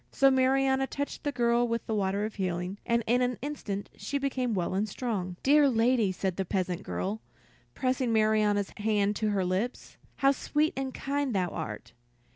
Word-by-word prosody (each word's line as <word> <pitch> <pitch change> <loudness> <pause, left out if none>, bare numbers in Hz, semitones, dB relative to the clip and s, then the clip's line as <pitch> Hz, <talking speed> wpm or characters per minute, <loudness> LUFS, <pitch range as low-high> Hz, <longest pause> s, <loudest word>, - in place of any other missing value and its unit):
So 275 0 +5
Marianna 265 0 +3
touched 285 +1 -4
the 290 - 0
girl 240 -2 +2
with 230 0 -2
the 220 - -2
water 200 0 0
of 215 - -5
healing, 185 0 -3
and 235 0 +2
in 245 +2 +2
an 250 -1 0
instant 210 -9 -4
she 240 +8 -3
became 260 -4 -1
well 180 -1 -1
and 205 +3 0
strong. 195 -6 -3
"Dear 290 +1 +5
lady," 230 -3 +3
said 185 -1 -2
the 195 - 0
peasant 185 -1 -2
girl, 205 +3 -3 0.5
pressing 255 -2 0
Marianna's 215 -2 +2
hand 210 -1 +1
to 215 -1 0
her 195 -3 +1
lips, 190 +7 -3 0.2
"how 275 -1 +4
sweet 295 +3 0
and 270 0 -3
kind 275 -2 -2
thou 180 -2 +1
art! 115 -2 -6
225 Hz, 180 wpm, -29 LUFS, 195-260 Hz, 0.5 s, So